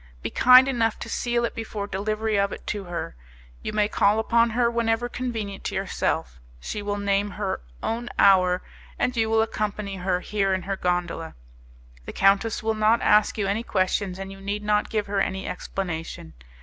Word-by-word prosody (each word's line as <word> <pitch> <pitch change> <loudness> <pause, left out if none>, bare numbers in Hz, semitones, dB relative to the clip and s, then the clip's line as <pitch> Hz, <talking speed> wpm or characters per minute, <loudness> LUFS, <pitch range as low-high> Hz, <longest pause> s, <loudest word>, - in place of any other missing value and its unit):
Be - - -3
kind 255 +1 +7
enough 230 -4 +1
to - - -6
seal 240 -1 0
it - - -3
before 220 -2 -5
delivery 215 +2 -2
of 200 0 +2
it - - -8
to 205 -2 -3
her. 170 - -5 0.5
You - - -4
may 210 -1 +2
call 205 0 +2
upon 230 +1 +3
her 235 +1 +2
whenever 235 0 0
convenient 225 -6 -4
to - - -3
yourself. 65 - -2 0.2
She 210 - -5
will 205 0 -2
name 200 0 0
her 200 -2 -2 0.2
own 235 +2 -2
hour, 185 -2 +5 0.3
and 250 - 0
you 225 -1 +1
will 220 0 +3
accompany 210 -2 -3
her 180 0 -1
here 195 -2 0
in 185 - -4
her 195 0 -2
gondola. 175 -3 -2 0.7
The - - -7
countess 200 +3 +2
will 220 0 +1
not 215 +2 +2
ask 210 +1 +4
you 205 - 0
any 200 +3 0
questions, 185 -2 -1
and 195 0 -6
you 195 0 -11
need 205 +2 -3
not 210 0 +1
give 215 -2 -1
her 200 -1 0
any 190 0 -2
explanation. 165 - -5
205 Hz, 190 wpm, -25 LUFS, 195-225 Hz, 0.7 s, kind